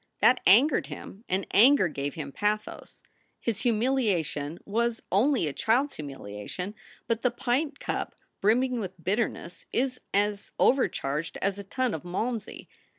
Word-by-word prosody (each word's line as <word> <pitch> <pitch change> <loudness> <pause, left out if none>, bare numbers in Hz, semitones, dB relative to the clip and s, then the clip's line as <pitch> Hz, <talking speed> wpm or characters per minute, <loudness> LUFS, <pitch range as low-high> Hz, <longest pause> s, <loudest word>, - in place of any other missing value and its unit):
That 250 - +5
angered 250 +10 +5
him 200 - -9
and 190 +2 0
anger 245 -1 +6
gave 145 -2 -4
him 145 -3 -5
pathos. 210 +6 -3 0.4
His 225 -3 -2
humiliation 210 - 0
was 230 +2 -1
only 240 - +3
a 145 - -2
child 235 - +2
s - - -11
humiliation, 135 - -6 0.3
but 230 -1 -1
the 250 - +3
pint 265 +4 -1
cup - - -3 0.3
brimming 245 +4 +2
with 185 -4 -6
bitterness 195 -3 -2
is 255 +1 0
as 205 0 0
overcharged 165 - +1
as 200 0 -1
a - - -5
tun 250 +4 -1
of 155 - -3
malmsey. 215 +6 -4
210 Hz, 145 wpm, -28 LUFS, 175-245 Hz, 0.4 s, anger